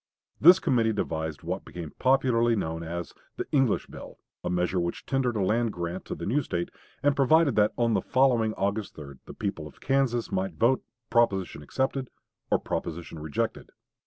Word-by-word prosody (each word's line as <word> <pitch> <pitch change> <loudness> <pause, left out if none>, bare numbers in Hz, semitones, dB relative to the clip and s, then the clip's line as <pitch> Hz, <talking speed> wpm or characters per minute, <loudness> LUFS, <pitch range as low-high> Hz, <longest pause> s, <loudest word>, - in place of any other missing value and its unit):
This 175 +5 +9
committee 115 -10 +2
devised 80 -6 -3
what - - -3
became 85 -3 -8
popularly 125 -3 +3
known 80 -5 -2
as 85 +1 -5 0.2
the - - -2
"English 135 -6 +2
bill," - - -11 0.3
a - - -2
measure 90 +1 0
which 85 0 -3
tendered 130 -3 0
a 105 - +1
land 115 +3 +1
grant 85 +1 -4
to - - -4
the - - -6
new 135 +8 +2
State, 85 -9 -3 0.3
and 145 -1 +3
provided 145 0 +4
that 105 0 +4
on 115 -1 +2
the - - +2
following 120 -4 +2
August 100 +1 -2
3d 70 -3 -10
the - - -9
people 100 -7 -3
of 75 - -16
Kansas 135 -4 +1
might 95 -2 -1
vote 120 +8 +2 0.3
"proposition 100 -9 +2
accepted" 130 - -2 0.4
or - - +4
"proposition 85 -1 -5
rejected." 75 -1 -3
110 Hz, 175 wpm, -27 LUFS, 85-130 Hz, 0.4 s, This